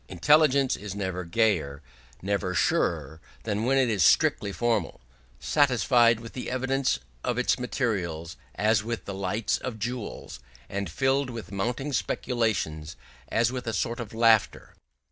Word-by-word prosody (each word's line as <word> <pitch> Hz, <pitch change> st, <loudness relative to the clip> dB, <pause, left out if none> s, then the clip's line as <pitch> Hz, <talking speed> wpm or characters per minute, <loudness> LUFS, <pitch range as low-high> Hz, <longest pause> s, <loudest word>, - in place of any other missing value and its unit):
Intelligence 140 Hz, -, +3 dB
is 100 Hz, -1 st, -7 dB
never 95 Hz, -2 st, -3 dB
gayer, 85 Hz, -8 st, 0 dB, 0.4 s
never 95 Hz, -2 st, -1 dB
surer, 80 Hz, -3 st, 0 dB, 0.2 s
than 105 Hz, 0 st, -2 dB
when 135 Hz, +2 st, +2 dB
it 130 Hz, -2 st, +3 dB
is 105 Hz, -5 st, 0 dB
strictly 100 Hz, -, +3 dB
formal, 120 Hz, +3 st, -1 dB, 0.4 s
satisfied 120 Hz, -, +3 dB
with 115 Hz, 0 st, -10 dB
the 125 Hz, -, -5 dB
evidence 130 Hz, -, 0 dB, 0.3 s
of 120 Hz, -, -1 dB
its 125 Hz, +1 st, +1 dB
materials, 90 Hz, -, -2 dB, 0.2 s
as 110 Hz, 0 st, +2 dB
with 115 Hz, 0 st, -4 dB
the 100 Hz, -, -5 dB
lights 100 Hz, +3 st, -1 dB
of 125 Hz, -4 st, -5 dB
jewels, 120 Hz, -, -5 dB, 0.3 s
and 100 Hz, -2 st, -4 dB
filled 135 Hz, -, +1 dB
with 115 Hz, -3 st, -8 dB
mounting 120 Hz, +8 st, -2 dB
speculations, 110 Hz, -12 st, -1 dB, 0.3 s
as 115 Hz, +1 st, +1 dB
with 125 Hz, -1 st, -5 dB
a 115 Hz, -, -1 dB
sort 115 Hz, +4 st, -2 dB
of 115 Hz, -3 st, -6 dB
laughter. 115 Hz, -1 st, +2 dB
115 Hz, 145 wpm, -27 LUFS, 95-125 Hz, 0.4 s, Intelligence